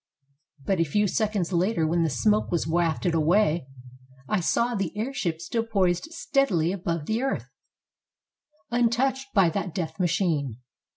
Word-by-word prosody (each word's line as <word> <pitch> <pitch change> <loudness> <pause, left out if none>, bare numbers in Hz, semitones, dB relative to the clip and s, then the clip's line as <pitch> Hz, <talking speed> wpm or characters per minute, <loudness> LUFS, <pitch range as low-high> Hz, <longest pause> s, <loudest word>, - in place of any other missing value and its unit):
But 190 -3 +1
a - - +5
few 205 +7 +1
seconds 205 -3 -1
later, 175 0 +1
when 170 +2 +1
the 165 - +2
smoke 210 - +1
was 170 - 0
wafted 170 +1 0
away, 165 -1 +2 0.6
I 215 - +1
saw 235 +7 +1
the 195 -6 -1
airship 210 -9 -2
still 225 +7 -2
poised 190 -3 +1
steadily 275 - 0
above 170 -5 -3
the 220 +6 -1
earth, 270 0 -2 1.2
untouched 245 +3 +1
by 190 -5 +5
that 185 -2 -3
death 160 -3 -4
machine. 165 - 0
185 Hz, 140 wpm, -26 LUFS, 165-220 Hz, 1.2 s, a